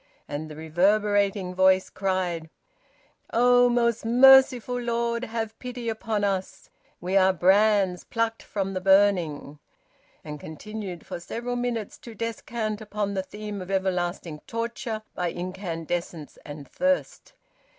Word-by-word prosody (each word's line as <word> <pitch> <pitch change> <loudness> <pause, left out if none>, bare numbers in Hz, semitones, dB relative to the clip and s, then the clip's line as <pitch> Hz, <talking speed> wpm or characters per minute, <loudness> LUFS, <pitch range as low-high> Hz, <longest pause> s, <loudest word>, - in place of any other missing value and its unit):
And 155 +2 -5
the 150 - -9
reverberating 195 +4 +1
voice 190 0 +3
cried 185 -4 -2 0.8
"Oh, 245 +1 +5
most 235 -1 +1
merciful 250 0 +6
Lord! 235 0 -1
Have 225 -1 -4
pity 245 -2 -5
upon 220 -1 -2
us. 195 -2 -3 0.3
We 185 +2 -3
are 190 -1 +5
brands 190 0 +3
plucked 230 -1 -2
from 195 -1 -3
the 185 - -3
burning." 180 -7 +2 0.6
And 150 -1 -7
continued 190 +3 -7
for - - -6
several 240 +7 -4
minutes 240 -3 -3
to 230 -2 -11
descant 225 -1 -4
upon 210 -1 -3
the 190 - -1
theme 210 +1 -7
of 185 - -8
everlasting 180 -4 -2
torture 230 -1 -4
by 180 - -2
incandescence 175 -3 -5
and 145 -1 -9
thirst. 275 - -1
200 Hz, 125 wpm, -26 LUFS, 180-230 Hz, 0.8 s, merciful